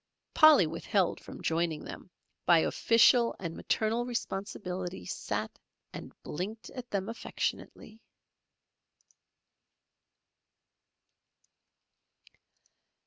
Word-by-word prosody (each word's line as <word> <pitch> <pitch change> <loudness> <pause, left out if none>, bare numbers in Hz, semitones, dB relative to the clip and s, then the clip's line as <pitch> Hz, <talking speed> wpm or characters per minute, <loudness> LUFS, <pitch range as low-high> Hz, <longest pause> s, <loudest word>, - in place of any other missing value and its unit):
Polly 310 - +7
withheld 165 +3 0
from - - -11
joining 165 -1 0
them, - - -9 0.4
by 170 - +7
official 230 +7 +4
and 170 -3 -5
maternal 225 +2 0
responsibility 190 - -4
sat - - -4 0.3
and - - -8
blinked 205 +8 -6
at 250 -2 -8
them 195 -1 -2
affectionately. 225 -1 -5
200 Hz, 75 wpm, -30 LUFS, 170-230 Hz, 0.4 s, Polly